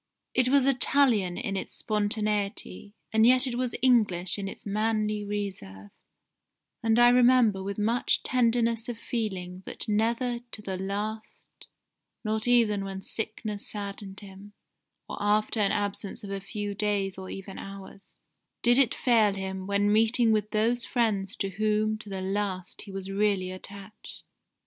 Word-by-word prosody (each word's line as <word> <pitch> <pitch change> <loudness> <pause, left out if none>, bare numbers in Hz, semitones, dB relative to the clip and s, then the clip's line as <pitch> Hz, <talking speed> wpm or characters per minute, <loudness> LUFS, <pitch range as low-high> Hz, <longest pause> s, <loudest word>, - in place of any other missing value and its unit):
It 255 -1 +3
was 275 -1 +4
Italian 245 -8 +3
in 220 -6 -3
its 190 - -4
spontaneity, 210 -1 -2 0.2
and 220 0 +4
yet 255 +3 +6
it 255 - -2
was 245 -1 -2
English 210 -8 +3
in 195 - -3
its - - -8
manly 215 0 0
reserve, 185 - -5 0.9
and 225 0 +2
I 240 0 +7
remember 245 -5 +5
with 195 +1 -4
much 225 +4 +1
tenderness 235 -2 +1
of 240 - -4
feeling 190 -6 -4
that - - -5
never 235 +3 0
to 210 - -5
the 190 -2 -3
last 205 +4 -6 0.6
(not 220 +1 -2
even 225 -5 +4
when 195 0 -6
sickness 215 -2 -4
saddened 200 -1 -6
him, 200 +1 -12 0.5
or - - -6
after 210 +2 +1
an 200 -2 +3
absence 205 0 -3
of 200 - -7
a 195 - -3
few 205 +2 -4
days 200 -2 -1
or 190 0 -8
even 195 0 -7
hours), 195 0 -11 0.5
did 240 +2 +5
it 260 -5 +3
fail 225 -5 +3
him 190 -1 -5
when 200 +1 +2
meeting 225 +1 +4
with 210 -1 +1
those 230 +3 +1
friends 210 -4 0
to 195 - -2
whom 215 +2 0
to 210 - -10
the 190 -1 -4
last 190 -1 -3
he 200 - -10
was 195 0 -6
really 195 -2 +1
attached. 200 +3 -10
210 Hz, 155 wpm, -27 LUFS, 195-230 Hz, 0.9 s, I